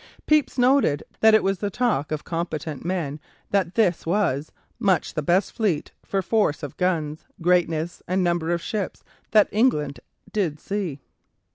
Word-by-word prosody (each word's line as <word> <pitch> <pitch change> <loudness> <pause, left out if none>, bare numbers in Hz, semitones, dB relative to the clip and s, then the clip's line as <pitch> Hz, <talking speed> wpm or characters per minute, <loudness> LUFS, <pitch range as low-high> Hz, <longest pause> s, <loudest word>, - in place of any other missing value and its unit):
Pepys 305 -3 +2
noted 250 - +3 0.2
that 220 0 +6
it 215 - +4
was 195 -1 0
the 205 - -1
talk 215 - 0
of 155 -1 -2
competent 160 -4 -4
men 165 -5 -2 0.3
that 190 -3 +1
this 185 -7 +2
was 165 -6 0 0.3
"much 190 -4 +1
the 155 - -1
best 175 +6 +2
fleet, 195 -10 -1
for 195 -1 -1
force 205 -9 +1
of 145 - -6
guns, 160 -4 -1
greatness 170 -1 +1
and 185 +1 +1
number 170 -2 0
of 170 -1 -1
ships, 205 -4 -3 0.3
that 215 -1 +6
ever - - -11
England 150 - +2 0.3
did 170 -8 0
see." 185 -9 -3
180 Hz, 160 wpm, -24 LUFS, 155-205 Hz, 0.3 s, that